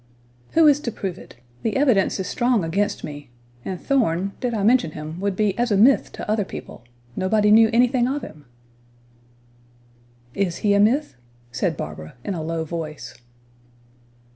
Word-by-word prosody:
"Who 325 Hz, -1 st, +6 dB
is 290 Hz, -1 st, +5 dB
to 245 Hz, -5 st, -4 dB
prove 190 Hz, -4 st, -5 dB
it? -, -, -14 dB, 0.3 s
The 225 Hz, -, -2 dB
evidence 250 Hz, -10 st, +2 dB
is 190 Hz, -, -2 dB
strong 240 Hz, -3 st, +1 dB
against 195 Hz, +6 st, -1 dB
me; 145 Hz, -3 st, -8 dB, 0.3 s
and 185 Hz, -2 st, -5 dB
Thorn, 195 Hz, -8 st, 0 dB
did 250 Hz, -, -1 dB
I 215 Hz, -4 st, -2 dB
mention 220 Hz, -8 st, +3 dB
him, 155 Hz, +2 st, -7 dB
would 200 Hz, 0 st, -1 dB
be 205 Hz, -1 st, +1 dB
as 240 Hz, -1 st, +1 dB
a 200 Hz, -, +3 dB
myth 250 Hz, +7 st, +4 dB
to -, -, -7 dB
other 215 Hz, 0 st, +1 dB
people; 155 Hz, -, -10 dB, 0.3 s
nobody 210 Hz, +2 st, +2 dB
knew 220 Hz, +1 st, +7 dB
anything 245 Hz, +1 st, +3 dB
of 280 Hz, +3 st, -2 dB
him." 150 Hz, -2 st, -11 dB, 1.9 s
"Is 190 Hz, -4 st, -1 dB
he 205 Hz, -, +4 dB
a 200 Hz, -, +3 dB
myth?" 245 Hz, -, +2 dB, 0.4 s
said -, -, -1 dB
Barbara, 80 Hz, 0 st, -7 dB
in 200 Hz, -, -3 dB
a 165 Hz, -, -4 dB
low 165 Hz, +1 st, -3 dB
voice. 155 Hz, -6 st, -6 dB
200 Hz, 165 wpm, -22 LUFS, 165-240 Hz, 1.9 s, knew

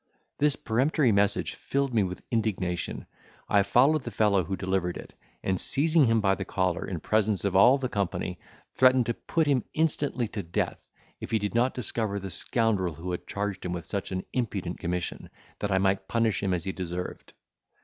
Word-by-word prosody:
This 145 Hz, -1 st, +4 dB
peremptory 130 Hz, +3 st, +2 dB
message 100 Hz, +1 st, +2 dB
filled 140 Hz, -2 st, -2 dB
me 110 Hz, -, +3 dB
with 95 Hz, -1 st, -3 dB
indignation. 95 Hz, -6 st, -1 dB, 0.4 s
I 100 Hz, -, +4 dB
followed 130 Hz, +10 st, +4 dB
the 125 Hz, -, -6 dB
fellow 105 Hz, -4 st, +2 dB
who 95 Hz, +4 st, -3 dB
delivered 95 Hz, -1 st, -1 dB
it, -, -, -10 dB, 0.3 s
and, 95 Hz, -1 st, 0 dB
seizing 155 Hz, +1 st, +3 dB
him 115 Hz, -1 st, +3 dB
by 95 Hz, -1 st, +3 dB
the 95 Hz, 0 st, -3 dB
collar 95 Hz, -1 st, -1 dB
in 90 Hz, -4 st, -4 dB
presence 105 Hz, +1 st, +1 dB
of 95 Hz, -2 st, 0 dB
all 120 Hz, +8 st, +7 dB
the 135 Hz, -2 st, -2 dB
company, 90 Hz, -4 st, -2 dB, 0.3 s
threatened 130 Hz, -1 st, +5 dB
to 120 Hz, -, 0 dB
put 160 Hz, +6 st, -1 dB
him 140 Hz, -4 st, +2 dB
instantly 145 Hz, -6 st, +1 dB
to 105 Hz, -, -4 dB
death, 85 Hz, -1 st, -3 dB, 0.3 s
if -, -, -7 dB
he 110 Hz, -, +2 dB
did 105 Hz, -1 st, -3 dB
not 120 Hz, +3 st, +2 dB
discover 110 Hz, -4 st, -2 dB
the 95 Hz, -1 st, -6 dB
scoundrel 100 Hz, -9 st, +1 dB
who 85 Hz, +4 st, -5 dB
had 90 Hz, -, -5 dB
charged 100 Hz, -1 st, -3 dB
him 90 Hz, -, -3 dB
with 85 Hz, -3 st, -5 dB
such 100 Hz, +3 st, -4 dB
an 95 Hz, 0 st, -3 dB
impudent 100 Hz, -8 st, -2 dB
commission, 90 Hz, 0 st, -3 dB, 0.3 s
that 105 Hz, -, -2 dB
I 95 Hz, -, +3 dB
might 95 Hz, 0 st, +1 dB
punish 115 Hz, -5 st, +1 dB
him 95 Hz, -2 st, 0 dB
as 90 Hz, -3 st, 0 dB
he 95 Hz, -, -2 dB
deserved. 90 Hz, -1 st, -6 dB
100 Hz, 190 wpm, -27 LUFS, 95-120 Hz, 0.4 s, all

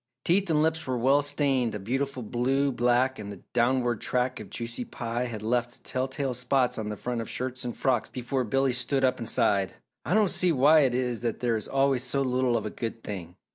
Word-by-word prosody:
Teeth 190 Hz, +2 st, +2 dB
and 155 Hz, -1 st, +3 dB
lips 160 Hz, -1 st, 0 dB
were 130 Hz, -1 st, 0 dB
well 135 Hz, +4 st, +4 dB
stained 140 Hz, -5 st, 0 dB
a -, -, -4 dB
beautiful 130 Hz, +5 st, -2 dB
blue 130 Hz, +5 st, +1 dB
black 125 Hz, +1 st, +2 dB
and 105 Hz, -1 st, -6 dB
the 100 Hz, -, -11 dB
downward 120 Hz, -1 st, +1 dB
track 125 Hz, 0 st, 0 dB
of -, -, -9 dB
juicy 120 Hz, +1 st, -5 dB
pie 120 Hz, +1 st, -3 dB
had 110 Hz, -3 st, -6 dB
left 120 Hz, +1 st, -1 dB
telltale 130 Hz, +1 st, -2 dB
spots 125 Hz, 0 st, +1 dB
on 105 Hz, -1 st, -3 dB
the 105 Hz, -, -3 dB
front 120 Hz, -1 st, -3 dB
of 115 Hz, -, -6 dB
shirts 130 Hz, +1 st, -3 dB
and 120 Hz, -1 st, -4 dB
frocks 125 Hz, -5 st, +1 dB
before 125 Hz, +1 st, -2 dB
Billy 135 Hz, +3 st, +1 dB
stood 130 Hz, +2 st, 0 dB
up 130 Hz, -, +1 dB
and 115 Hz, -1 st, -1 dB
sighed. 100 Hz, -2 st, +2 dB, 0.3 s
"I 180 Hz, -, 0 dB
don't 215 Hz, -3 st, +4 dB
see 180 Hz, -1 st, +2 dB
why 150 Hz, +2 st, +6 dB
it 130 Hz, -4 st, +3 dB
is 125 Hz, -3 st, -1 dB
that 115 Hz, -2 st, -2 dB
there 120 Hz, -2 st, +1 dB
is 110 Hz, -, -3 dB
always 135 Hz, -2 st, +2 dB
so 135 Hz, +2 st, 0 dB
little 125 Hz, -2 st, +1 dB
of 110 Hz, -, -4 dB
a 105 Hz, -, -3 dB
good 115 Hz, -1 st, -5 dB
thing! 90 Hz, -4 st, -6 dB
125 Hz, 220 wpm, -27 LUFS, 120-135 Hz, 0.3 s, why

